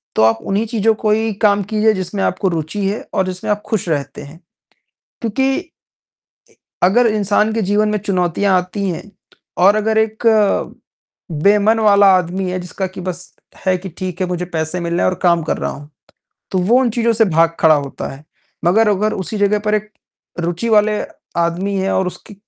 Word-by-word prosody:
तो - - +2
आप 110 0 +3
उन्हीं 200 +3 0
चीज़ों 225 -1 +2
को 215 0 -1
ही 220 0 +1
काम 205 -1 +3
कीजिए 215 0 +3
जिसमें 190 +1 -3
आपको 195 - 0
रुचि 170 +5 -3
है 205 +3 -2
और 190 - +1
जिसमें 185 +2 -5
आप 210 0 -1
खुश 210 -5 -2
रहते 145 -3 -3
हैं। 150 +4 -13 0.8
क्योंकि 265 +4 0
इ - - -4 1.2
अगर 230 +7 +4
इंसान 210 0 +1
के 225 - -1
जीवन 205 +2 +1
में 210 0 0
चुनौतियाँ 190 -1 +1
आती 185 +3 -4
हैं, 165 - -5 0.6
और 200 +4 +5
अगर 220 +1 +1
एक 220 0 -1 1.2
बेमन 210 +2 +4
वाला 200 -2 +5
आदमी 180 +1 -2
है, 185 - -2
जिसका 185 +2 -4
कि 185 0 -9
बस 180 0 -6 0.3
है 185 -1 +3
कि, 190 +1 -8
ठीक 180 +1 -6
है 185 - +1
मुझे 180 0 -2
पैसे 165 0 -3
मिलने 170 0 -1
हैं - - +3
और - - -3
काम 170 -2 +3
कर 160 - -2
रहा - - -2
हूँ, 145 +1 -10 0.6
तो 190 - 0
वो 230 +8 +3
उन 245 - +1
चीज़ों 235 0 +1
से 225 0 +3
भाग 165 -1 +2
खड़ा 160 -2 +5
होता 140 -2 -4
है। 140 +2 -13 0.4
मगर 210 +5 +4
अगर 210 +2 +1
उसी 195 +3 -4
जगह 205 +1 +2
पर 210 0 +2
एक 210 0 -4 0.5
रुचि 175 +7 -2
वाले 210 -1 +3 0.4
आदमी 180 +4 -1
है 190 +1 0
और 190 -1 +1
उसके 205 - -8
195 Hz, 190 wpm, -17 LUFS, 180-215 Hz, 1.2 s, और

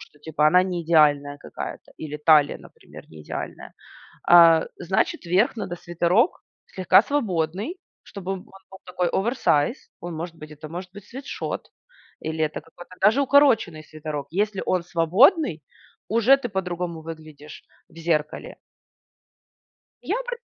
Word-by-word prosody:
что, 150 - -16
типа, 150 0 +1
она 180 +4 +5
не 180 -2 -3
идеальная 145 -3 +3
какая-то. - - -8
Или 150 -1 -7
талия, 150 -1 +4
например, - - -15
не 80 -1 -12
идеальная. - - -7 0.6
А, 165 -2 +7
значит 190 +1 -1
верх 185 +9 +2
надо 180 -5 -4
свитерок 175 - +1 0.3
слегка 185 -2 +4
свободный, 205 - -2 0.3
чтобы 195 -1 -7
он 190 - -6
был 190 0 -16
такой 180 -1 -1
оверсайз. 215 - 0
Он 175 -1 -7
может 165 +1 -6
быть 155 -1 -12
Это 150 +1 -10
может 180 +3 -7
быть 205 -1 -12
свитшот. 270 +5 -6 0.5
Или 160 0 -4
это 155 +1 -5
какой-то 175 +3 -15
даже 220 +8 +4
укороченный 255 - +3
свитерок. 150 -2 -6
Если 205 +2 -1
он 185 -1 +1
свободный, 175 - +3 0.5
уже 230 +5 +5
ты 245 - -5
по-другому 180 -3 -4
выглядишь 155 -2 -11 0.3
в 165 - -22
зеркале. 155 -2 -2 1.5
Я - - -1
пр - - -5
175 Hz, 135 wpm, -24 LUFS, 155-200 Hz, 1.5 s, А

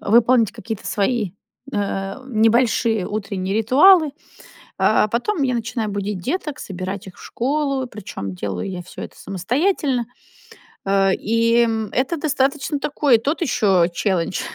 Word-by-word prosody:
выполнить 230 0 +4
какие-то 225 -2 -6
свои, 210 -2 0 0.4
э, 195 -1 -2
небольшие 225 -2 +2
утренние 200 -2 -3
ритуалы. 305 - +6 0.7
А - - +3
потом 265 - -1
я 250 -1 +1
начинаю 230 -1 -2
будить 200 -1 -3
деток, 300 - -3
собирать 190 +1 -6
их 185 - -12
в - - -14
школу. 275 0 -1
Причем, 100 - -7
делаю 95 - -4
я 180 -2 -5
всё 180 - -11
это - - -10
самостоятельно. 250 - 0 0.8
Э, 195 0 +3
и 230 +2 +2 0.2
это 270 +6 0
достаточно 285 0 0
такой, 280 -3 +3
тот 285 +10 -2
ещё 195 - +3
челлендж. 180 0 -1
225 Hz, 130 wpm, -21 LUFS, 195-265 Hz, 0.8 s, ритуалы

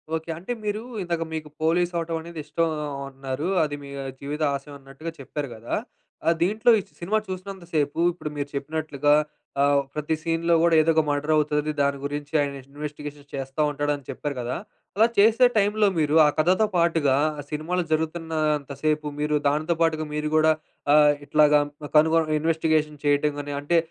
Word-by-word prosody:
Okay. 160 +1 -5
అంటే 185 +8 -6
మీరు 210 +1 -2 0.2
ఇందాక 170 -2 -1
మీకు 155 -1 -5
పోలీస్ 170 +2 +2
అవ్వటమనేది 165 0 -3
ఇష్టం 160 +2 0 0.4
అన్నారు. 135 +3 -4 0.2
అది 145 -1 -2
మీ 140 - -9 0.3
జీవిత 145 +2 -5
ఆశయమన్నట్టుగా 140 +2 -8
చెప్పారు 140 +1 -5
గదా! 115 +2 -4 0.5
ఆహ్, 165 - +4
దీంట్లో 215 +6 +3
ఈ - - -3 0.2
సినిమా 195 +6 0
చూసినంత 190 0 -6
సేపు 145 -2 0 0.2
ఇప్పుడు 165 -3 -6
మీరు 145 0 -3
చెప్పినట్లుగా 145 0 0 0.5
ఆహ్, 140 0 +4
ప్రతి 150 +1 -1
సీన్‌లో 165 +1 +1
కూడా, 170 -1 +4
ఏదో 160 - +1
ఒక 160 - +5
మర్డర్ 145 +1 0
అవుతాది 150 0 +1
దాని 140 0 +1
గురించి 145 +1 -5
ఆయన 140 -1 -2 0.2
ఇన్వెస్టిగేషన్ 145 0 -7
చేస్తా 135 +2 -3
ఉంటాడని 145 0 -2
చెప్పారు 145 -1 -4
గదా! 120 +1 -3 0.4
అలా 220 +3 +5
చేసే 225 +5 +6
టైంలో 210 +1 +3
మీరు 150 0 +2
ఆ - - +5
కథతో 185 +7 +3
పాటు‌గా 165 -5 +3 0.3
సినిమాలు 165 +4 -1
జరుగుతున్నంత 155 -2 -1
సేపు 155 -1 +1
మీరు 150 0 +1
దానితో 155 +4 +1
పాటుగా 160 -1 +2
మీరు 150 0 -1
గూడా 155 0 +5 0.4
ఆహ్, 150 -1 +6
ఇట్లాగా 150 0 +5 0.4
కనుగొని 160 0 +4
ఇన్వెస్టిగేషన్ 155 -2 +1
చేయటంగాని 145 0 +1
అంటే 170 +4 +2
155 Hz, 155 wpm, -25 LUFS, 145-165 Hz, 0.5 s, చేసే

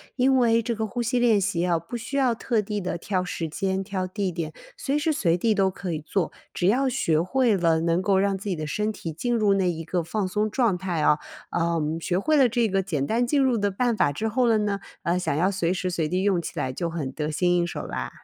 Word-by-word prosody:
因 265 +1 +3
为 230 -2 +4
这 235 - -1
个 220 -1 -2
呼 245 +3 -3
吸 245 +2 +1
练 230 -4 +4
习 190 -3 -1
呀， 175 -1 +2
不 240 +8 -6
需 235 +4 -6
要 260 -3 +3
特 230 -1 0
地 210 0 -3
地 180 -2 -3
挑 185 +2 -1
时 165 -2 -4
间 190 +3 -1
挑 190 -1 -3
地 190 0 -2
点， 160 -2 -4 0.2
随 280 +2 -1
时 300 +2 +1
随 175 - +1
地 220 +4 +2
都 195 -2 +2
可 185 -1 -5
以 155 - -2
做， 165 +4 -2 0.2
只 175 - 0
要 260 +7 +3
学 160 -10 +1
会 245 +5 +2
了 165 -2 +2
能 170 +2 +1
够 195 0 +2
让 195 0 +1
自 195 - -8
己 190 - 0
的 155 -1 -4
身 210 +8 -1
体 165 - -6
进 240 +10 -1
入 210 -3 +3
那 190 -2 +2
一 165 -1 -3
个 175 +2 -1
放 195 +5 -2
松 210 +3 0
状 220 -4 +1
态 175 -3 -2
啊。 150 0 +4 0.3
呃， 170 -1 0 0.2
学 175 +2 -1
会 305 +11 +2
了 270 -3 +6
这 235 -1 +1
个 195 0 +1
简 160 -8 -2
单 235 +8 +1
进 280 +2 +2
入 255 -3 +2
的 205 -1 +1
办 240 +5 +1
法 145 - +2
之 220 +10 -2
后 245 +3 +1
了 225 -1 +4
呢， 205 -1 -1 0.2
呃， 175 +2 +1
想 180 -6 -1
要 180 +6 +2
随 180 -3 0
时 185 0 -2
随 165 -3 -1
地 180 +4 -1
用 195 -4 +2
起 165 - -7
来 130 - -1
就 170 +6 -3
很 155 -6 -4
得 150 +2 -3
心 175 +3 +1
应 175 0 +1
手 - - -5
啦。 - - -4
190 Hz, 285 characters per minute, -25 LUFS, 170-225 Hz, 0.3 s, 了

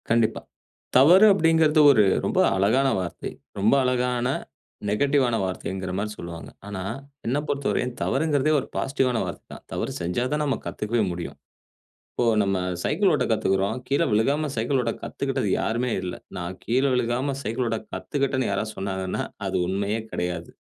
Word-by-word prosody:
கண்டிப்பா. 115 -1 +2 0.6
தவறு 175 +10 +8
அப்படிங்கிறது 160 -3 +3
ஒரு 110 -6 +5 0.2
ரொம்ப - - +1 0.2
அழகான 110 +8 +3
வார்த்தை. 90 -2 -5 0.3
ரொம்ப 105 +5 +4
அழகான 125 -1 +1 0.6
நெகட்டிவ்வான 130 +2 +2
வார்த்தைங்கிற 95 0 -4
மாரி 105 +2 -2
சொல்லுவாங்க. 85 -1 -8 0.2
ஆனா 100 -2 -5 0.5
என்ன 125 +4 +1
பொறுத்தவரையும் 130 -3 -1
தவறுங்கிறதே 145 +1 +1
ஒரு 135 - -6
பாசிட்டிவ்வான 130 -3 0
வார்த்தை - - -7
தான். - - -11
தவறு - - -2
செஞ்சா 90 +7 -1
தான் 150 - 0
நாம் 140 -2 -1
கத்துக்கவே 110 +1 -1
முடியும். 85 -1 -6 0.7
இப்போ 120 - -1 0.2
நம்ம 100 -1 0 0.3
சைக்கிள் 195 -2 +2
ஓட்ட 145 -4 +1
கத்துக்கிறோம். 100 -1 +1
கீழ 140 - +1
விழுகாம 140 +8 +2
சைக்கிள் 125 +5 +1
ஓட்ட 115 -1 -1
கத்துக்கிட்டது - - -2
யாருமே 120 +2 -1
இல்ல. 90 -1 -4 0.2
நான் 90 +1 -5
கீழ 125 +4 +2
விழுகாம 125 +3 0
சைக்கிள் 120 +2 -1
ஓட்ட 115 -1 -1
கத்துக்கிட்டன்னு 135 -3 -1
யாராவது 105 +2 -2
சொன்னாங்கன்னா. 95 -1 -2 0.2
அது - - -2
உண்மயே 100 +3 -1
கிடையாது. 90 -1 -3
120 Hz, 145 wpm, -25 LUFS, 100-135 Hz, 0.7 s, தவறு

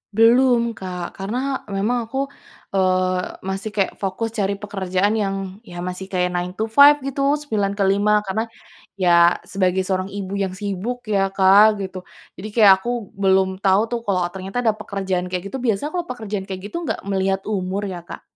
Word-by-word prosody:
Belum, 235 +1 +4
Kak, 180 -5 -7
karena 250 +8 -3
memang 220 +4 -1
aku, 270 +4 -3 0.4
eee, 185 -1 +2 0.2
masih 190 +3 -3
kayak 195 -2 +1
fokus 195 +4 -2
cari 200 0 +1
pekerjaan 195 -1 -1
yang, 195 -2 0 0.3
ya 175 -1 -7
masih 180 +1 -5
kayak 180 -2 0
nine-to-five 220 +11 +4
gitu, 275 +1 +1
9-5 205 -6 +1
karena 220 +3 -2 0.5
ya 170 -1 +5 0.2
sebagai 190 -1 +1
seorang 185 -1 -1
ibu 195 -1 -5
yang 190 -1 -3
sibuk 205 +5 -3
ya 195 - +3
Kak 200 +3 +6
gitu. 190 0 -6 0.4
Jadi 200 - -6
kayak 210 -4 +8
aku 235 - -5 0.3
belum 190 -1 +4
tahu 195 +1 +4
tuh 240 - -1
kalau 185 -2 +1
ternyata 190 +3 -6
ada 225 - +4
pekerjaan 190 -3 -2
kayak 180 -1 -3
gitu. 265 - -3
Biasa 230 +6 0
kalau 350 -1 -2
pekerjaan 215 -5 -4
kayak 190 -1 -6
gitu - - -4
enggak - - -2
melihat 190 0 +1
umur 195 -1 -2
ya 180 - -5
Kak? - - -8
195 Hz, 165 wpm, -21 LUFS, 190-220 Hz, 0.5 s, kayak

